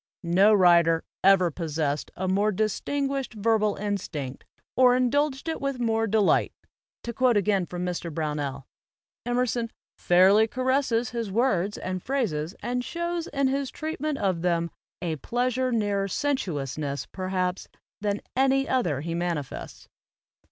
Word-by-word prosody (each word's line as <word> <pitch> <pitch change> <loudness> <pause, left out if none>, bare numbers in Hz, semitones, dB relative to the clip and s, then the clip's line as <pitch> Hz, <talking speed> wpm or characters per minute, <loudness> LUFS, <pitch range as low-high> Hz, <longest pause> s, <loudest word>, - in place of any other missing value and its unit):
"No 185 +5 +4
writer 170 -4 +5 0.2
ever 185 -3 +5
possessed 150 -3 -2
a 185 - -3
more 200 +3 +2
distinguished 270 +6 -2
verbal 215 -1 +2
instinct, 175 -10 -4 0.3
or 250 -1 +6
indulged 270 +3 +1
it 325 - -3
with 275 -2 -2
more 225 -1 +1
de 220 +1 +2
light," 205 - +3 0.5
to 235 - -4
quote 250 -1 +3
again 200 -3 +1
from 180 0 -4
Mr. 175 -1 -3
Brownell; 145 -3 -3 0.6
Emerson 245 -1 0 0.2
" - - -73
fairly 190 +5 +5
caresses 255 -1 0
his 230 -3 -3
words 205 -4 +1
and 185 0 -4
phrases 190 - -2
and 245 +1 -1
shows 340 +2 -3
in 275 -1 0
his 275 0 -1
treatment 310 -2 -3
of 190 -7 0
them 170 -1 0 0.3
a 160 -3 -2
pleasure 250 - -1
nearer 205 -3 0
sensuousness, 145 - -2
perhaps, 185 -1 -2 0.3
than 205 0 -1
any 270 +1 +3
other 175 - 0
he 165 +2 -4
manifests." 170 -5 -4
205 Hz, 135 wpm, -26 LUFS, 175-255 Hz, 0.6 s, or